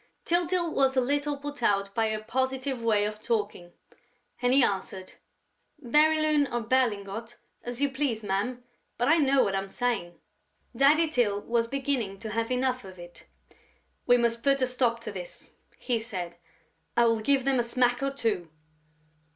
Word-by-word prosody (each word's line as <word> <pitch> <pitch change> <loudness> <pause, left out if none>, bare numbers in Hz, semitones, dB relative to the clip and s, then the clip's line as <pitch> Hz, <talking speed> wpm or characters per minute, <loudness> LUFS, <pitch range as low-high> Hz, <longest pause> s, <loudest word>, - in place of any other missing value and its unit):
Tyltyl 345 0 +1
was 270 -1 +2
a - - +7
little 285 +3 -1
put 290 +1 -7
out 200 -1 +1
by 225 0 +1
her 215 0 -3
positive 260 +2 -2
way 215 -3 +2
of 210 0 -5
talking; 205 -6 -2 0.7
and 245 0 +2
he 270 0 +6
answered: 190 -2 -3 0.7
"Bérylune 305 +2 +3
or 240 0 -1
Berlingot, 225 -2 -1 0.3
as 245 +3 -4
you 280 - +1
please, 260 -5 -2
ma'am, 210 +6 -2 0.3
but 245 - +1
I 320 +3 +5
know 275 -3 +4
what 195 - -1
I'm 195 0 -2
saying...." 200 -7 -2 0.6
Daddy 295 +6 +5
Tyl 225 -9 +1
was 230 +1 0
beginning 260 -6 -2
to 215 +2 -7
have 230 +1 -1
enough 255 0 0
of 190 -1 -11
it: 175 0 -13 0.8
"We 245 - +6
must 235 -1 0
put 275 0 +2
a - - +5
stop 245 -2 0
to - - -6
this," - - -9 0.3
he 240 -3 -1
said. 185 -7 -6 0.6
"I 235 - +5
will 230 -1 +2
give 265 +3 +1
them 270 -2 +2
a - - +2
smack 245 +1 +1
or 275 - +1
two." 220 -11 -2
245 Hz, 165 wpm, -27 LUFS, 215-275 Hz, 0.8 s, a